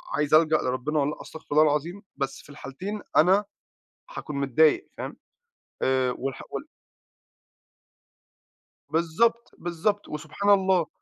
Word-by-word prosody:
عايز 150 +1 0
ألجَأ 155 0 +6
لربِّنا 130 +4 -1
والّا 140 +1 +1
لأ، - - -8
أستغفر 160 - -11
الله 150 +1 +6
العظيم، 155 +6 0 0.2
بس 140 - -3
في - - -19
الحالتين 185 +9 -6 0.2
أنا 190 +5 +5 0.7
هاكون 150 - -6
متضايق 140 +3 +3
فاهم. - - -5 0.7
آآ 130 -1 +2
والح 135 0 -4
وال - - -4 2.3
بالضبط، 180 +10 +1
بالضبط، 175 +4 -1
وسبحان 200 +7 -3
الله. 190 -4 +4
155 Hz, 120 wpm, -26 LUFS, 145-190 Hz, 2.3 s, ألجَأ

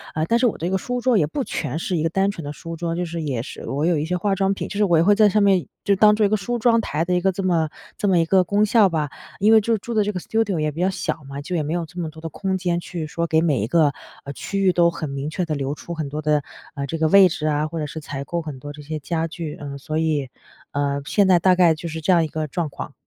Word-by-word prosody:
嗯， 155 - 0
但 235 +4 +3
是 250 - +4
我 225 - -2
这 170 - -2
个 190 - +1
书 245 +6 -3
桌 245 -2 +3
也 150 - +2
不 270 - -3
全 160 - -3
是 180 - -2
一 155 - 0
个 165 - +1
单 195 +3 +1
纯 170 - -8
的 145 - -5
书 165 +1 -7
桌， 165 0 -3
就 175 +1 -2
是 170 0 -5
也 135 -7 -2
是 - - -9
我 145 +3 -1
有 170 -1 +2
一 150 - -1
些 180 +2 -1
化 195 +2 0
妆 195 0 +1
品 - - -5
就 200 - -5
是 210 - +3
我 175 -5 +4
也 160 - +4
会 205 - +5
在 215 -1 +5
上 210 +1 +2
面 195 -3 +3 0.2
就 200 - +3
当 210 +2 +6
做 215 - +3
一 - - +2
个 215 - +2
梳 240 +5 -2
妆 230 0 +4
台 155 -2 -2
的 180 - 0
一 180 - +2
个 190 +1 +2
这 195 +2 -4
么 165 -4 +1 0.3
这 205 - -1
么 185 -3 +4
一 165 - +3
个 185 +2 +4
功 205 +4 +2
效 215 -2 +4
吧。 155 -4 -1 0.3
因 215 +3 +5
为 220 - +7
就 225 +2 +1
住 235 +3 -6
的 215 -2 +3
这 210 - -1
个 185 - -4
studio 205 -3 -1
也 155 0 0
比 165 +4 -5
较 185 - +3
小 165 -4 -3
嘛， 140 +1 -7
就 180 +5 -4
也 160 - 0
没 150 +2 -3
有 170 -1 -1
这 175 +3 -10
么 165 -2 -2
多 160 +1 -13
的 165 - -5
空 190 +4 -2
间 175 -2 -1
去 170 -2 -5
说 170 +2 -2
给 160 -1 +3
每 150 -9 +1
一 105 - -1
个， 150 +1 +3 0.3
呃， 140 - -6
区 195 +7 -4
域 190 -2 +4
都 170 -1 +4
很 160 -3 -5
明 140 +2 -4
确 175 +3 -2
地 155 -2 -2
留 140 0 -2
出 170 - -7
很 155 -4 -4
多 150 +2 -4
的， 150 -1 +1 0.3
呃， 140 -1 -3
这 165 - -3
个 160 0 +2
位 195 +2 +7
置 155 -2 -3
啊， 150 0 +1
或 165 +1 -5
者 150 - -2
是 150 +2 -6
采 145 -2 -5
购 170 +3 -2
很 150 -5 -7
多 145 +2 -8
这 150 - -11
些 155 +1 -5
家 165 +2 -2
具。 165 -2 -6
嗯， 140 -1 -6
所 155 +3 -4
以， 155 -4 0 0.4
嗯， 140 0 -1
现 200 +5 +3
在 180 -2 +5
大 185 +1 +4
概 175 -3 +5
就 165 +2 -7
是 160 0 -5
这 175 - +2
样 170 -2 +5
一 - - -1
个 155 0 -3
状 155 +2 -2
况。 145 - -8
170 Hz, 360 characters per minute, -22 LUFS, 155-195 Hz, 0.4 s, 为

